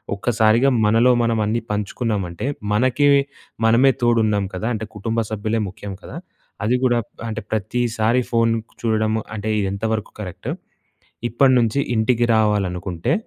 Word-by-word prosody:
ఒక్కసారిగా 115 +4 +3 0.2
మనలో 115 +4 +4
మనం 115 -1 +1
అన్నీ 115 +3 0
పంచుకున్నామంటే. 105 -3 -2 0.3
మనకి 130 +5 +2 0.6
మనమే 120 +4 +5
తోడున్నాం 110 -4 +2
కదా! 110 +5 -3
అంటే 110 0 -3
కుటుంబ 110 +3 -2
సభ్యులే 110 +1 -1
ముఖ్యం 100 +1 -8
కదా! - - -9 0.5
అది 120 +4 +2
కూడా 120 -2 +3
ప్ - - -44 0.2
ఆహ్, - - -4
అంటే 110 0 -4
ప్రతిసారి 115 +2 0
ఫోను 115 -1 +2 0.3
చూడడము 110 -1 +1
అంటే 110 +1 -3
ఇది 100 - 0
ఎంతవరకు 110 +1 -2
కరెక్టు? 90 -4 -6 0.8
ఇప్పటి 130 +3 +4
నుంచి 120 +3 +1 0.2
ఇంటికి 120 +2 +2
రావాలనుకుంటే 95 - 0
110 Hz, 135 wpm, -21 LUFS, 105-120 Hz, 0.8 s, మనమే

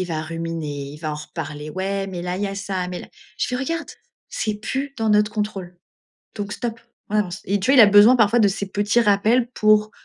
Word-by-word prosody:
Il 185 - 0
va 160 -2 -3
ruminer, 160 -3 -5
il 150 - -11
va 155 -1 -4
en - - -3
reparler. 150 -1 -7
Ouais, 195 +2 -2
mais 180 -2 -5
là 180 +1 -3
il 200 - -3
y - - 0
a 195 - -5
ça, 195 -2 -3
mais 180 - -5
là - - -11 0.3
je - - +1
fais: 250 - -1
«Regarde! 330 +6 -3 0.4
C'est 215 -1 -2
plus 270 +6 -4
dans 220 -1 +1
notre 210 0 +3
contrôle. 195 -4 -4 0.6
Donc 205 -1 -4
stop, 230 -2 -4 0.3
on 215 - 0
avance» 195 -1 -1
et 200 +2 0
tu 240 +8 +1
vois, 275 - +5
il - - +11
a - - +9
besoin 205 +4 +7
parfois 225 0 +4
de 205 - +5
ces 195 +1 -3
petits 205 +4 +1
rappels 225 +3 +3
pour, 215 -1 +3
200 Hz, 240 wpm, -22 LUFS, 175-215 Hz, 0.6 s, il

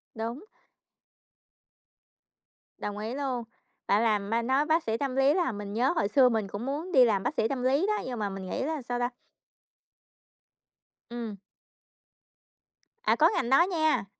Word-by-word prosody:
Đúng. 235 - -5 2.3
Đồng 205 0 -5
ý 220 +3 -4
luôn, 265 -4 -2 0.4
bạn 205 +3 +3
làm, 210 -1 0
a, 230 - +2
nói 265 +5 +1
bác 320 +1 +2
sĩ 225 0 -1
tâm 270 -1 -2
lý 270 +2 +4
làm 335 - 0
mình 205 0 -6
nhớ 250 +7 +2
hồi 265 - +1
xưa 255 +2 +5
mình 220 -4 -1
cũng 200 +4 -6
muốn 300 +7 -4
đi 260 -7 +7
làm 200 -4 +1
bác 255 - -1
sĩ 225 - +1
tâm 260 -1 -3
lý 275 +8 +2
đó, 425 0 0
nhưng 245 -3 -4
mà 205 -1 -1
mình 195 -1 -7
nghĩ - - -2
là, 310 0 -2
sao 245 0 -3
ta 245 0 0 2.0
Ừm. 230 -4 -6 1.7
À, - - +3
có - - +5
ngành 240 - -1
đó 270 +6 +6
nha. 315 - +1
245 Hz, 170 wpm, -28 LUFS, 220-280 Hz, 2.3 s, đi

